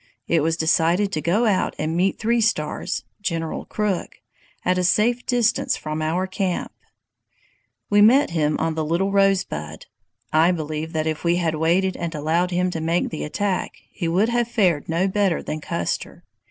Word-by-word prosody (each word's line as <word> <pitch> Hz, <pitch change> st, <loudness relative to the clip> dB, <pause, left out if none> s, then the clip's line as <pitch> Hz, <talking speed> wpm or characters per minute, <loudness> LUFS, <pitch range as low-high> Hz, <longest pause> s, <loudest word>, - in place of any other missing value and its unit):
It 165 Hz, -2 st, +2 dB
was 160 Hz, +2 st, 0 dB
decided 170 Hz, +4 st, +2 dB
to 155 Hz, -, -2 dB
go 195 Hz, +9 st, +2 dB
out 200 Hz, -4 st, +1 dB
and 155 Hz, +2 st, -2 dB
meet 185 Hz, +3 st, +1 dB
Three 230 Hz, +1 st, +1 dB
Stars 225 Hz, +2 st, -1 dB, 0.2 s
[General 165 Hz, -5 st, -3 dB
Crook] 210 Hz, -4 st, -3 dB, 0.5 s
at 180 Hz, 0 st, +2 dB
a -, -, +1 dB
safe 230 Hz, +7 st, +2 dB
distance 240 Hz, -2 st, +1 dB
from 155 Hz, 0 st, -4 dB
our 165 Hz, +4 st, 0 dB
camp. 185 Hz, -1 st, -2 dB, 1.2 s
"We 205 Hz, 0 st, +4 dB
met 245 Hz, +2 st, +5 dB
him 155 Hz, -2 st, +1 dB
on 160 Hz, 0 st, -1 dB
the 160 Hz, 0 st, -2 dB
Little 170 Hz, +6 st, 0 dB
Rosebud. 190 Hz, -, 0 dB, 0.5 s
I 160 Hz, +3 st, +5 dB
believe 155 Hz, 0 st, -4 dB
that 155 Hz, -1 st, -1 dB
if 155 Hz, -1 st, -2 dB
we 170 Hz, 0 st, +2 dB
had 170 Hz, -3 st, 0 dB
waited 175 Hz, +4 st, +1 dB
and 170 Hz, -1 st, -4 dB
allowed 160 Hz, +4 st, 0 dB
him 180 Hz, 0 st, 0 dB
to 165 Hz, -, -4 dB
make 165 Hz, +2 st, 0 dB
the 155 Hz, -, -4 dB
attack, 195 Hz, +4 st, -2 dB, 0.2 s
he 170 Hz, -, -3 dB
would 190 Hz, +7 st, +2 dB
have 240 Hz, -1 st, +1 dB
fared 185 Hz, -12 st, +1 dB
no 170 Hz, +4 st, +1 dB
better 195 Hz, -3 st, 0 dB
than 155 Hz, -, -4 dB
Custer. 85 Hz, -11 st, -4 dB
175 Hz, 175 wpm, -22 LUFS, 160-195 Hz, 1.2 s, met